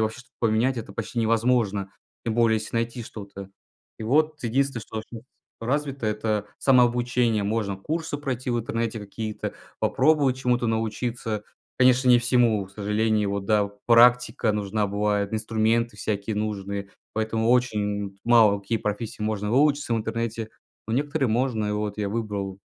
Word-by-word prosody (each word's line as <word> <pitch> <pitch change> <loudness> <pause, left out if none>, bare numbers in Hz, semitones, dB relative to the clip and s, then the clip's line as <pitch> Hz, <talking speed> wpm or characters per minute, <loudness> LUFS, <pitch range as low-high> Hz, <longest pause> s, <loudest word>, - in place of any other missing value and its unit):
вообще 110 +3 -2
что-то 130 +2 -16
поменять, 115 +3 +2
это 105 -3 -7
почти 120 - -3
невозможно, 110 -3 +1 0.3
тем 115 - -1
более 115 -1 +4
если 110 - -8
найти 115 +1 -1
что-то. 100 -3 -9 0.5
И - - -6
вот 150 +6 +1
единственное, 130 0 0
что 110 0 -5
щас 115 -2 -8 0.4
развито- 135 0 -2
это 105 -1 -1
самообучение. 120 -3 +3
Можно 100 -2 -1
курсы 155 - -3
пройти 130 -3 -3
в 120 - +1
интернете 115 0 -2
какие-то, 105 +1 -5 0.2
попробовать 140 -2 +3
чему-то 125 -2 +1
научиться. 115 0 -2 0.4
Конечно, 130 0 +5
не 120 - +7
всему, 120 -4 +2
к 95 - -19
сожалению. 105 0 0
Вот, 100 -1 -2
да, 105 -1 +2 0.2
практика 120 -1 +5
нужна 105 0 -1
бывает, 100 0 0
инструменты 110 +1 0
всякие 105 +1 -2
нужные. 100 -2 -3 0.2
Поэтому 110 +1 0
очень 105 -5 0
мало 110 -4 +5
какие 100 +4 -1
профессии 105 +1 -4
можно 105 -1 -1
выучиться 140 0 +2
в - - +1
интернете. 115 0 -3 0.4
Но 110 - -3
некоторые 145 0 0
можно. 120 -2 0
И 105 - -1
вот 105 -1 -2
я 105 -1 -1
выбрал 100 -3 -3
110 Hz, 150 wpm, -25 LUFS, 105-125 Hz, 0.5 s, не